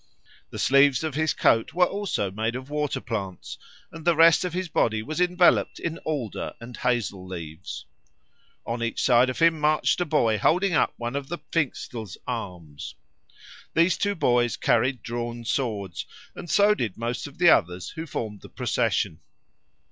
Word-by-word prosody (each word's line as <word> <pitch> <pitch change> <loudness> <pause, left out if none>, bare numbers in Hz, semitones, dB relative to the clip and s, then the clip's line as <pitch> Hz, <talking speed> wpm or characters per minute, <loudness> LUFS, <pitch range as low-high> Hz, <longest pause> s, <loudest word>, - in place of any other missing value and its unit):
The - - -8
sleeves 140 0 +4
of 155 -2 -2
his 155 +1 +1
coat 115 +7 +2
were 180 0 +5
also 195 - -2
made 110 +4 -2
of 130 +2 -7
water 150 -1 -1
plants, 95 -5 -5 0.3
and 165 - -10
the 170 0 +3
rest 165 +1 +6
of 180 - -2
his 180 +2 -3
body 110 -8 +1
was 155 +7 -3
enveloped 180 0 +3
in 165 0 -4
alder 140 -9 -4
and 120 +1 -9
hazel 115 -6 -1
leaves. 85 0 -7 0.8
On 115 0 -3
each 115 -1 -2
side 125 0 +5
of 130 - -4
him 165 -1 +3
marched 155 +3 +2
a - - +1
boy 115 -8 +2
holding 180 - +2
up - - +2
one 120 +2 -4
of 140 -1 -3
the 175 - -4
Pfingstl's 120 - -3
arms. 90 - -6 0.8
These 170 +2 +4
two 205 0 0
boys 120 -6 +2
carried 120 +1 +1
drawn 120 0 -5
swords, 105 -8 -2 0.3
and 175 - -9
so 205 +4 +5
did 115 - -3
most 120 +4 -3
of 145 - -14
the 175 -1 +6
others 90 +1 +1
who 160 0 -7
formed 105 -7 -5
the - - -12
procession. - - -1
125 Hz, 170 wpm, -25 LUFS, 110-165 Hz, 0.8 s, rest